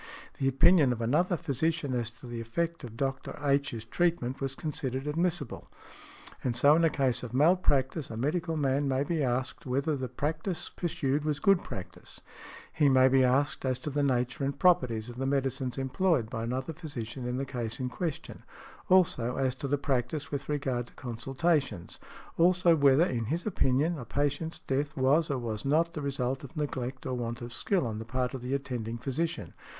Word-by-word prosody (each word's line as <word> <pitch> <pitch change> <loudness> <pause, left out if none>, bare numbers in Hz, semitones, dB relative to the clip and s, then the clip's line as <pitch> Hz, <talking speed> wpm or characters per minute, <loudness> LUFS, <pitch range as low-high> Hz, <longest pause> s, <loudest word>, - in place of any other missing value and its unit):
the 135 - +1
opinion 145 +1 +5
of 120 - -2
another 160 +10 +2
physician 145 0 -1
as 120 -2 -1
to 120 +2 -14
the 120 -1 -5
effect 165 +9 -2
of 115 -2 -8
Dr. 135 0 -3
H.'s 140 -5 0
treatment 135 -2 0
was 135 0 -2
considered 135 -4 -3
|118| 150 - -3
admissible. 165 -4 -2 0.8
And 120 -2 0
so 140 +5 +6
in 165 - +3
a 165 - +5
case 130 -4 +1
of 125 -1 -6
malpractice 145 -2 +2
a 110 - -6
medical 160 +6 -1
man 140 0 +1
may 135 0 +1
be 160 +1 -1
asked 130 +3 -1
whether 140 +4 0
the 130 -2 -4
practice 160 +4 -3
pursued 155 -5 -1
was 150 -1 -1
good 195 +3 +4
practice. 90 -2 -8 0.5
He 150 -3 +4
may 130 0 +6
be 130 0 +4
asked 135 +3 +2
as 130 -2 0
to 145 +4 -5
the 145 +1 0
nature 125 -1 0
and 140 0 -1
properties 125 -12 +3
of 120 0 -8
the 135 +1 -1
medicines 135 -2 -1
employed 135 -2 +1
by 115 0 -3
another 130 +6 -3
physician 130 -6 -6
in 125 +1 -2
the 135 - -2
case 120 -3 -3
in 130 - -1
question; 160 +3 -4 0.5
also, 160 -10 +3
as 130 -2 +1
to 140 - -3
the 145 +1 +1
practice 140 +1 -2
with 140 -1 -4
regard 130 -5 -1
to - - -18
consultations; 130 - -1 0.4
also, 175 0 +5
whether, 140 +2 +5
in 120 -8 -2
his 160 +9 -2
opinion, 155 -4 +1
a 125 - -7
patient's 145 +5 -1
death 145 +3 -1
was 145 +5 +3
or 140 - 0
was 110 -4 -4
not 165 +4 +2
the 150 - -4
result 135 -2 -2
of 145 +4 -10
neglect 130 -3 -3
or 130 - -2
want 120 -1 -3
of 120 0 -7
skill 185 +4 0
on 110 -2 -3
the - - -5
part 125 +2 -2
of 130 - -5
the 125 +2 -1
attending 120 -4 -4
physician. 145 +7 -3
135 Hz, 190 wpm, -29 LUFS, 125-155 Hz, 0.8 s, so